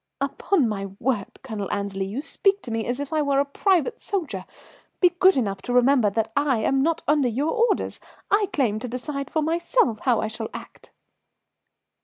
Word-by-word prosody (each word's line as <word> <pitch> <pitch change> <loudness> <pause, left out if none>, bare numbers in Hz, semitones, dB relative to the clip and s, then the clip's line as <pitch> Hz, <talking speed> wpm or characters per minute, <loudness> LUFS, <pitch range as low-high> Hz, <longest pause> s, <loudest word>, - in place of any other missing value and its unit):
"Upon 280 +2 +1
my 195 -2 -3
word, 230 -5 -2
Colonel 215 -6 -5
Annesley, 200 -1 -2
you 220 +8 -4
speak 390 +5 +1
to 240 - -6
me 225 0 -2
as 245 +2 -2
if 285 +2 -5
I 310 - +2
were 280 -1 +2
a 280 - +2
private 345 +3 +1
soldier. 315 - -3 0.5
Be 360 - +6
good 380 -5 +6
enough 200 -6 -1
to 245 - -4
remember 250 -2 +4
that 225 +2 -1
I 285 -3 +2
am 270 0 +2
not 330 +3 0
under 290 -3 +3
your 275 +7 -1
orders. 465 -3 0 0.3
I 405 0 +3
claim 245 - +1
to 250 - -5
decide 275 +3 -4
for 315 - 0
myself 330 - +1
how 245 -4 +2
I - - -1
shall 220 +1 -5
act." - - -11
270 Hz, 190 wpm, -24 LUFS, 225-315 Hz, 0.5 s, Be